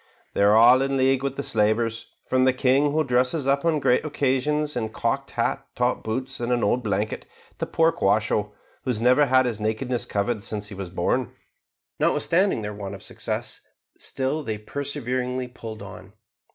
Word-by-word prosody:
"They -, -, 0 dB
are 100 Hz, +1 st, +6 dB
all 120 Hz, +3 st, +7 dB
in 135 Hz, 0 st, 0 dB
league 130 Hz, 0 st, +3 dB
with 140 Hz, -1 st, -2 dB
the 140 Hz, -, -3 dB
slavers, 115 Hz, +1 st, 0 dB, 0.2 s
from 130 Hz, 0 st, +2 dB
the 130 Hz, -, +4 dB
king 135 Hz, +3 st, +3 dB
who 155 Hz, +1 st, +2 dB
dresses 130 Hz, +2 st, +1 dB
up 140 Hz, +1 st, +2 dB
on 165 Hz, -2 st, +2 dB
great 125 Hz, -3 st, +2 dB
occasions 150 Hz, +1 st, 0 dB
in 120 Hz, -2 st, -1 dB
a -, -, -5 dB
cocked -, -, -2 dB
hat, -, -, 0 dB
top -, -, 0 dB
boots, 130 Hz, +4 st, -3 dB
and 120 Hz, +1 st, -2 dB
an 120 Hz, -1 st, +1 dB
old 120 Hz, +5 st, +2 dB
blanket, 105 Hz, +1 st, -2 dB, 0.3 s
to -, -, -2 dB
poor 165 Hz, 0 st, +3 dB
Quasho, 105 Hz, -6 st, +1 dB, 0.3 s
who -, -, -4 dB
has 120 Hz, -4 st, 0 dB
never 125 Hz, +5 st, +4 dB
had 130 Hz, 0 st, +4 dB
his 115 Hz, -4 st, -2 dB
nakedness 110 Hz, +3 st, -2 dB
covered 105 Hz, +1 st, -1 dB
since 105 Hz, -2 st, -5 dB
he -, -, -8 dB
was 95 Hz, -2 st, -6 dB
born." 95 Hz, +8 st, -1 dB, 0.7 s
Notwithstanding 180 Hz, -, +2 dB
their 105 Hz, 0 st, -4 dB
want 100 Hz, -1 st, -6 dB
of 95 Hz, -, -12 dB
success, -, -, -4 dB, 0.3 s
still 135 Hz, +4 st, -2 dB
they 110 Hz, -6 st, -3 dB
perseveringly 125 Hz, +1 st, -3 dB
pulled 110 Hz, -4 st, -9 dB
on. 100 Hz, -, -11 dB
125 Hz, 185 wpm, -24 LUFS, 110-135 Hz, 0.7 s, all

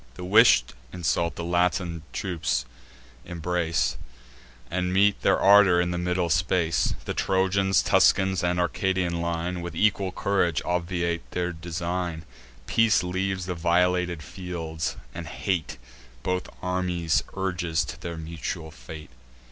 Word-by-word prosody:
The 90 Hz, -, -8 dB
wish'd 110 Hz, +5 st, +5 dB, 0.2 s
insult 85 Hz, -2 st, -1 dB
the 85 Hz, -, -5 dB
Latine 85 Hz, -1 st, 0 dB
troops 75 Hz, -9 st, -2 dB, 0.6 s
embrace, 80 Hz, -7 st, -1 dB, 0.7 s
And 90 Hz, +1 st, -1 dB
meet 100 Hz, +2 st, +3 dB
their -, -, +3 dB
ardour 100 Hz, -3 st, +6 dB
in 90 Hz, 0 st, +1 dB
the 85 Hz, -, -2 dB
middle 90 Hz, -1 st, 0 dB
space. 85 Hz, +1 st, +1 dB
The -, -, -2 dB
Trojans, 95 Hz, 0 st, +2 dB
Tuscans, 95 Hz, -2 st, +3 dB
and 90 Hz, 0 st, +1 dB
Arcadian 90 Hz, -1 st, 0 dB
line, 85 Hz, +1 st, -2 dB
With 85 Hz, -1 st, -6 dB
equal 100 Hz, 0 st, +2 dB
courage 90 Hz, -5 st, +1 dB
obviate 85 Hz, -1 st, -2 dB
their 90 Hz, 0 st, -2 dB
design. 85 Hz, 0 st, -4 dB, 0.4 s
Peace 115 Hz, -, +3 dB
leaves 95 Hz, +1 st, -2 dB
the 90 Hz, -, -2 dB
violated 90 Hz, 0 st, +1 dB
fields, 80 Hz, -5 st, -5 dB, 0.2 s
and 85 Hz, -2 st, -7 dB
hate 85 Hz, +1 st, -2 dB, 0.5 s
Both 90 Hz, 0 st, -2 dB
armies 90 Hz, -3 st, 0 dB
urges 90 Hz, -4 st, -1 dB
to -, -, -8 dB
their 85 Hz, -1 st, -5 dB
mutual 80 Hz, 0 st, -5 dB
fate. 75 Hz, +4 st, -11 dB
90 Hz, 125 wpm, -26 LUFS, 85-90 Hz, 0.7 s, ardour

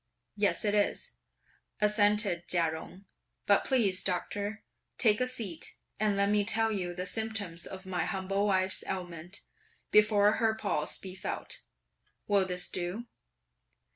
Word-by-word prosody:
"Yes, 205 Hz, +1 st, +1 dB
it 205 Hz, -, +2 dB
is," 205 Hz, -1 st, +1 dB, 0.7 s
assented 210 Hz, -3 st, +2 dB
Chia 170 Hz, -2 st, +2 dB
Jung; 180 Hz, +4 st, -9 dB, 0.4 s
"but 200 Hz, -, +4 dB
please, 200 Hz, -8 st, +2 dB
Doctor, 205 Hz, +3 st, -2 dB, 0.3 s
take 215 Hz, -1 st, +4 dB
a 255 Hz, -, +2 dB
seat, 220 Hz, -9 st, -4 dB, 0.2 s
and 210 Hz, -1 st, +2 dB
let 200 Hz, 0 st, +3 dB
me 210 Hz, 0 st, +3 dB
tell 225 Hz, +1 st, +2 dB
you 180 Hz, -4 st, -2 dB
the 180 Hz, 0 st, -3 dB
symptoms 200 Hz, -4 st, -2 dB
of 190 Hz, 0 st, -8 dB
my 180 Hz, -3 st, -1 dB
humble 195 Hz, +2 st, -1 dB
wife's 190 Hz, -1 st, +1 dB
ailment, 180 Hz, 0 st, -5 dB, 0.5 s
before 210 Hz, -1 st, +5 dB
her 225 Hz, -1 st, +2 dB
pulse 200 Hz, -8 st, -1 dB
be 185 Hz, -1 st, -8 dB
felt. 190 Hz, -, -3 dB, 0.6 s
Will 200 Hz, -2 st, +3 dB
this 180 Hz, -1 st, 0 dB
do?" 185 Hz, +6 st, -4 dB
200 Hz, 140 wpm, -31 LUFS, 180-210 Hz, 0.7 s, before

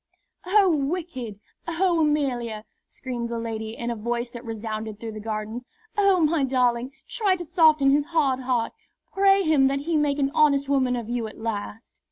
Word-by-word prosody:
"Oh, 400 Hz, +1 st, +5 dB
wicked! 275 Hz, -, -3 dB, 0.3 s
Oh, 340 Hz, 0 st, +1 dB
Amelia!" 245 Hz, -8 st, 0 dB, 0.2 s
screamed 240 Hz, -2 st, -5 dB
the 235 Hz, -, -3 dB
lady, 225 Hz, -1 st, -5 dB
in 235 Hz, 0 st, -3 dB
a -, -, -3 dB
voice 235 Hz, +2 st, -3 dB
that 240 Hz, 0 st, -9 dB
resounded 220 Hz, -2 st, -5 dB
through 225 Hz, -1 st, -6 dB
the 215 Hz, -, -7 dB
Gardens. 215 Hz, +2 st, -4 dB, 0.3 s
"Oh, 395 Hz, -3 st, +4 dB
my 310 Hz, -1 st, +2 dB
darling, 250 Hz, -1 st, +1 dB, 0.2 s
try 420 Hz, -6 st, +1 dB
to 350 Hz, -1 st, -6 dB
soften 310 Hz, -5 st, +4 dB
his 285 Hz, +1 st, +3 dB
hard 290 Hz, -6 st, +1 dB
heart; 250 Hz, -3 st, -1 dB, 0.4 s
pray 390 Hz, 0 st, +4 dB
him 305 Hz, -5 st, +4 dB
that 275 Hz, +1 st, -1 dB
he 325 Hz, +3 st, -1 dB
make 295 Hz, -1 st, +1 dB
an 275 Hz, -1 st, +1 dB
honest 280 Hz, -3 st, +3 dB
woman 260 Hz, -3 st, +2 dB
of 235 Hz, -3 st, -4 dB
you 240 Hz, -1 st, -2 dB
at 215 Hz, -, -11 dB
last." 220 Hz, 0 st, -6 dB
260 Hz, 180 wpm, -25 LUFS, 230-310 Hz, 0.4 s, Oh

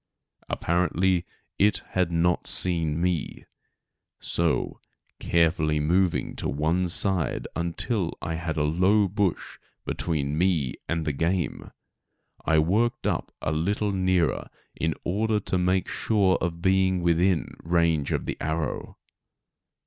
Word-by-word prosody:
Apparently 90 Hz, +1 st, +1 dB, 0.3 s
it 105 Hz, +1 st, +3 dB
had 90 Hz, -2 st, 0 dB
not 85 Hz, +1 st, +1 dB
seen 80 Hz, -4 st, +1 dB
me, 90 Hz, -2 st, -2 dB, 0.7 s
so, 85 Hz, -2 st, -1 dB, 0.4 s
carefully 80 Hz, -2 st, +2 dB
moving 90 Hz, +4 st, +1 dB
to -, -, -2 dB
one 80 Hz, +5 st, 0 dB
side 95 Hz, -1 st, +2 dB
until 85 Hz, +3 st, -1 dB
I 80 Hz, -, -4 dB
had 80 Hz, -1 st, -3 dB
a 75 Hz, -, +2 dB
low 95 Hz, +7 st, +3 dB
bush 100 Hz, -1 st, -2 dB, 0.3 s
between 75 Hz, -2 st, -2 dB
me 85 Hz, -8 st, +1 dB, 0.2 s
and 80 Hz, -1 st, -1 dB
the 75 Hz, -, 0 dB
game, 85 Hz, 0 st, -1 dB, 0.7 s
I 80 Hz, -, +2 dB
worked 105 Hz, +10 st, +1 dB
up -, -, -1 dB
a 75 Hz, -, 0 dB
little 100 Hz, +6 st, 0 dB
nearer 95 Hz, -3 st, +1 dB, 0.3 s
in 80 Hz, 0 st, -1 dB
order 105 Hz, +4 st, 0 dB
to 95 Hz, -, -1 dB
make 90 Hz, +1 st, +1 dB
sure 100 Hz, -4 st, +2 dB
of 85 Hz, -1 st, -3 dB
being 95 Hz, -1 st, +2 dB
within 85 Hz, 0 st, +2 dB
range 85 Hz, -3 st, +1 dB
of -, -, -1 dB
the -, -, -4 dB
arrow. 80 Hz, -2 st, -3 dB
85 Hz, 125 wpm, -26 LUFS, 80-95 Hz, 0.7 s, it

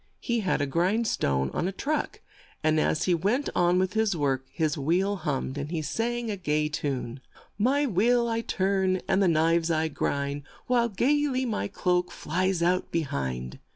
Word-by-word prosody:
He 235 Hz, -2 st, -1 dB
had 190 Hz, -8 st, 0 dB
a -, -, +2 dB
grind 180 Hz, +11 st, +1 dB
stone 65 Hz, -, 0 dB
on 175 Hz, -, -1 dB
a -, -, -1 dB
truck, 290 Hz, +10 st, -3 dB, 0.4 s
and 155 Hz, 0 st, +3 dB
as 155 Hz, -, +1 dB
he 180 Hz, -, +2 dB
went 205 Hz, -, 0 dB
on 175 Hz, 0 st, +3 dB
with 185 Hz, 0 st, +1 dB
his 220 Hz, -3 st, +1 dB
work; 135 Hz, -4 st, -1 dB
his 155 Hz, -3 st, 0 dB
wheel 180 Hz, +8 st, +1 dB
hummed, 140 Hz, -4 st, -3 dB
and 145 Hz, +1 st, -4 dB
he 160 Hz, -2 st, -2 dB
sang 230 Hz, -, -2 dB
a -, -, -2 dB
gay 150 Hz, -4 st, 0 dB
tune: 135 Hz, -4 st, -3 dB, 0.2 s
" -, -, -30 dB
My 285 Hz, +2 st, +2 dB
wheel 235 Hz, +2 st, +2 dB
I 230 Hz, 0 st, 0 dB
turn, 190 Hz, -3 st, 0 dB
and 195 Hz, -, +2 dB
the 195 Hz, -, +4 dB
knives 165 Hz, 0 st, +2 dB
I 160 Hz, -1 st, +1 dB
grind, 140 Hz, -1 st, -2 dB, 0.2 s
While 240 Hz, -2 st, +2 dB
gay 290 Hz, +8 st, +2 dB
ly 260 Hz, -1 st, -1 dB
my 220 Hz, -4 st, -1 dB
cloak 180 Hz, -2 st, 0 dB
flies 180 Hz, +2 st, -1 dB
out 180 Hz, +1 st, +1 dB
be 165 Hz, -, +1 dB
hind." 65 Hz, -, -4 dB
180 Hz, 190 wpm, -27 LUFS, 150-220 Hz, 0.4 s, the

